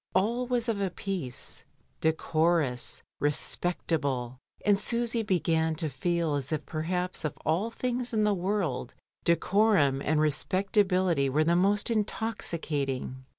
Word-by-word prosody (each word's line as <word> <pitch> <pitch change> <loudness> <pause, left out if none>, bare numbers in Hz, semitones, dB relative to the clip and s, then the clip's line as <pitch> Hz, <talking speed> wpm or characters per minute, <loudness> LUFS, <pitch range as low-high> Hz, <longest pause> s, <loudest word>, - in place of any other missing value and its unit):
All 235 +6 +1
was 245 -1 0
of 215 -3 0
a 195 - +1
piece; 180 -9 -5 0.4
decorous, 160 -4 +1 0.2
respectable, 145 -4 0 0.3
and 205 -1 +4
Susy 235 0 0
began 165 -5 +1
to 155 0 -1
feel 165 +3 0
as 140 0 -2
if 155 -1 -2
perhaps 180 +3 -2
of 155 - -3
all 175 +9 +1
things 245 +1 -3
in 215 -2 +1
the 210 -1 +3
world 180 - -2 0.3
de 170 - +5
corum 170 -8 +3
and 155 +1 +1
respectability 185 0 +2
were 150 +4 +2
the 170 +2 +3
most 200 +5 +3
intoxicating. 160 - -2
170 Hz, 130 wpm, -29 LUFS, 150-205 Hz, 0.4 s, de